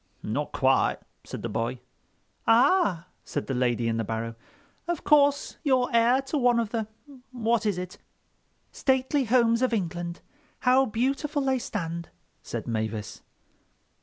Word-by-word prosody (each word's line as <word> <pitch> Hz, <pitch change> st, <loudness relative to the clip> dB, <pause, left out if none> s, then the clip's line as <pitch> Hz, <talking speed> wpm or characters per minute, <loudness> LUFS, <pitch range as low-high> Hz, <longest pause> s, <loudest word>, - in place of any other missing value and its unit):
"Not -, -, -2 dB
quite," -, -, +2 dB, 0.3 s
said -, -, -8 dB
the -, -, -1 dB
boy. -, -, -2 dB, 0.7 s
"Ah!" 225 Hz, -, +4 dB, 0.2 s
said 145 Hz, -, -4 dB
the 135 Hz, -, -3 dB
lady 120 Hz, -2 st, +1 dB
in 115 Hz, 0 st, 0 dB
the 115 Hz, -, 0 dB
barrow, 115 Hz, +1 st, -3 dB, 0.5 s
"Of 345 Hz, -2 st, -2 dB
course 285 Hz, -1 st, +3 dB
you're 260 Hz, -5 st, +2 dB
heir 240 Hz, +3 st, +4 dB
to 280 Hz, +2 st, -2 dB
one 245 Hz, -2 st, +4 dB
of 225 Hz, -2 st, -2 dB
the—what 235 Hz, 0 st, -3 dB
is 200 Hz, -4 st, 0 dB
it...?" 180 Hz, 0 st, -6 dB, 0.7 s
"'Stately 265 Hz, +1 st, +1 dB
homes 230 Hz, 0 st, +3 dB
of 255 Hz, -2 st, +1 dB
England—how 230 Hz, -, -1 dB
beautiful 275 Hz, +6 st, -1 dB
they 265 Hz, -1 st, +1 dB
stand,'" 170 Hz, -7 st, -4 dB, 0.3 s
said -, -, -5 dB
Mavis. 110 Hz, -2 st, -3 dB
235 Hz, 135 wpm, -27 LUFS, 170-265 Hz, 0.7 s, Ah